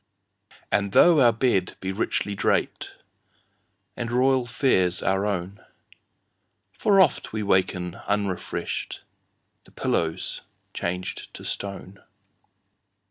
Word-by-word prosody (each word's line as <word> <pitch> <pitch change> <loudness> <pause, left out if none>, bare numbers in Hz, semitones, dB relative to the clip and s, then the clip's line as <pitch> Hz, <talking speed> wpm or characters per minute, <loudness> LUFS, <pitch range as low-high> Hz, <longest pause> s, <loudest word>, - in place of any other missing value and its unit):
And 100 -1 +1
tho 170 -3 +7
our 120 -3 +6
bed 115 -6 0
be 95 - -3
richly 100 0 -1
drapedAnd 115 +3 -5
royal 130 +1 +2
fares 95 -8 +1
our 95 +2 +1
own, 100 +1 -4 1.1
For 205 -3 +3
oft 175 -8 +3
we 110 -1 -2
waken 95 -3 +1
unrefreshed—The 100 -3 -5
pillow's 80 -1 -2 0.3
changed 90 +1 -4
to - - -10
stone! 100 -1 -6
100 Hz, 90 wpm, -25 LUFS, 95-120 Hz, 1.1 s, tho